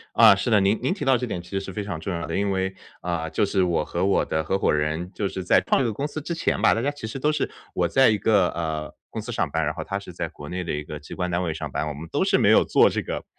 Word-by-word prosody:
啊， 110 Hz, -3 st, +8 dB
是 100 Hz, +5 st, -2 dB
的， 105 Hz, -3 st, +5 dB
您 100 Hz, +3 st, +2 dB
您 130 Hz, -, +1 dB
提 195 Hz, -, -5 dB
到 135 Hz, -1 st, +4 dB
这 125 Hz, +1 st, -2 dB
点 90 Hz, -6 st, -4 dB
其 90 Hz, -, -16 dB
实 95 Hz, -, -1 dB
是 95 Hz, 0 st, -7 dB
非 105 Hz, +2 st, -4 dB
常 95 Hz, -6 st, -5 dB
重 95 Hz, +4 st, -4 dB
要 85 Hz, -2 st, -3 dB
的 85 Hz, -, -3 dB
因 100 Hz, 0 st, +1 dB
为， 95 Hz, 0 st, -1 dB, 0.3 s
啊， 85 Hz, -2 st, -2 dB
就 80 Hz, -, +1 dB
是 95 Hz, -1 st, +1 dB
我 85 Hz, -3 st, +1 dB
和 85 Hz, +4 st, -2 dB
我 100 Hz, -, +3 dB
的 80 Hz, 0 st, -1 dB
合 95 Hz, +5 st, -1 dB
伙 -, -, +2 dB
人 75 Hz, +5 st, -1 dB
就 100 Hz, 0 st, -2 dB
是 95 Hz, -, -5 dB
在 -, -, +5 dB
创 135 Hz, -, +2 dB
业 115 Hz, -, 0 dB
公 140 Hz, +7 st, -2 dB
司 155 Hz, -, -5 dB
之 170 Hz, +3 st, -4 dB
前 -, -, 0 dB
吧， -, -, +5 dB
大 115 Hz, -, -1 dB
家 140 Hz, -, 0 dB
其 145 Hz, -6 st, -7 dB
实 125 Hz, +5 st, -5 dB
都 150 Hz, +3 st, +2 dB
是 150 Hz, -, 0 dB, 0.3 s
我 90 Hz, -, +2 dB
在 135 Hz, +9 st, +5 dB
一 110 Hz, -2 st, +2 dB
个， 100 Hz, -5 st, +3 dB
呃， 80 Hz, -3 st, -4 dB, 0.2 s
公 -, -, -4 dB
司 -, -, -7 dB
上 -, -, 0 dB
班， 80 Hz, 0 st, 0 dB
然 75 Hz, +1 st, -1 dB
后 80 Hz, -, -5 dB
他 100 Hz, 0 st, -3 dB
是 95 Hz, -2 st, -10 dB
在 -, -, -4 dB
国 75 Hz, 0 st, -10 dB
内 90 Hz, 0 st, -4 dB
的 -, -, -2 dB
一 75 Hz, -, -3 dB
个 75 Hz, 0 st, -7 dB
机 75 Hz, -, -10 dB
关 90 Hz, -1 st, -2 dB
单 90 Hz, +1 st, 0 dB
位 85 Hz, -, -1 dB
上 80 Hz, -2 st, -5 dB
班， 75 Hz, -, -2 dB
我 75 Hz, -, -4 dB
们 80 Hz, +3 st, -8 dB
都 -, -, +1 dB
是 -, -, +3 dB
没 -, -, +4 dB
有 -, -, +6 dB
做 -, -, +5 dB
这 -, -, -2 dB
个 -, -, -5 dB
95 Hz, 355 characters per minute, -24 LUFS, 80-105 Hz, 0.3 s, 啊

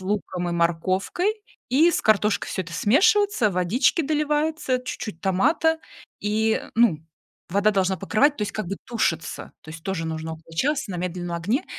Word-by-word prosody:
луком 185 Hz, -2 st, -2 dB
и -, -, -2 dB
морковкой, 185 Hz, -, 0 dB, 0.3 s
и 300 Hz, +7 st, +5 dB
с -, -, 0 dB
картошкой 210 Hz, -1 st, +2 dB
всё 190 Hz, -, -2 dB
это 165 Hz, -, -11 dB
смешивается, 330 Hz, -, +3 dB
водички 195 Hz, -, +2 dB
доливается, 300 Hz, -2 st, 0 dB
чуть-чуть 215 Hz, -7 st, -6 dB
томата. 310 Hz, -, +2 dB, 0.4 s
И, 220 Hz, +2 st, +1 dB
ну, 225 Hz, -9 st, +4 dB, 0.5 s
вода 200 Hz, +3 st, +3 dB
должна 190 Hz, -1 st, +1 dB
покрывать, 275 Hz, +9 st, +2 dB
то -, -, -1 dB
есть 205 Hz, -, -3 dB
как 215 Hz, -, -4 dB
бы 195 Hz, +3 st, -4 dB
тушится, 175 Hz, -9 st, -2 dB
то 160 Hz, -, -11 dB
есть 160 Hz, 0 st, -9 dB
тоже 180 Hz, -4 st, -2 dB
нужно 160 Hz, 0 st, -4 dB
около 160 Hz, +1 st, -12 dB
часа 270 Hz, -, 0 dB
на -, -, -4 dB
медленном 175 Hz, -1 st, -3 dB
огне. 210 Hz, -, -1 dB
205 Hz, 165 wpm, -24 LUFS, 175-270 Hz, 0.5 s, и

